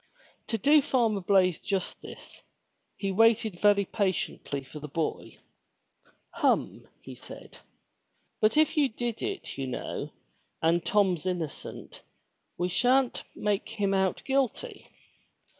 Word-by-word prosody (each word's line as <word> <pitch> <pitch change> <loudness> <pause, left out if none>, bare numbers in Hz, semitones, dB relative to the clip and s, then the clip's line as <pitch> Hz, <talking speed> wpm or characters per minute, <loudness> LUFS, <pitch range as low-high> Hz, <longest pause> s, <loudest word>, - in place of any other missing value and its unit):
'* - - -34
To 225 - -1
do 290 +8 +5
Farmer 230 -7 +1
Blaize 185 -2 +3
justice, 195 -2 -5 0.6
he 195 -1 -2
waited 220 -2 +3
very 205 -1 +4
patiently 185 -8 -2
for 145 +3 -10
the 150 - -7
boy. 155 +2 -3 0.9
"Hum," - - 0 0.3
said - - -11
he. - - -16 0.8
But 215 +5 +3
if 310 0 +4
you 290 -3 +3
did 235 0 -4
it 390 - -4
you 135 - -2
know, 130 - -4 0.5
and 165 +1 +2
Tom's 185 -3 +2
innocent, 175 -5 -5 0.6
we 175 - 0
sha'n't 250 +7 +2
make 205 -1 -1
him 205 -3 -1
out 190 -1 +1
guilty. 275 - -1
200 Hz, 125 wpm, -28 LUFS, 180-235 Hz, 0.9 s, do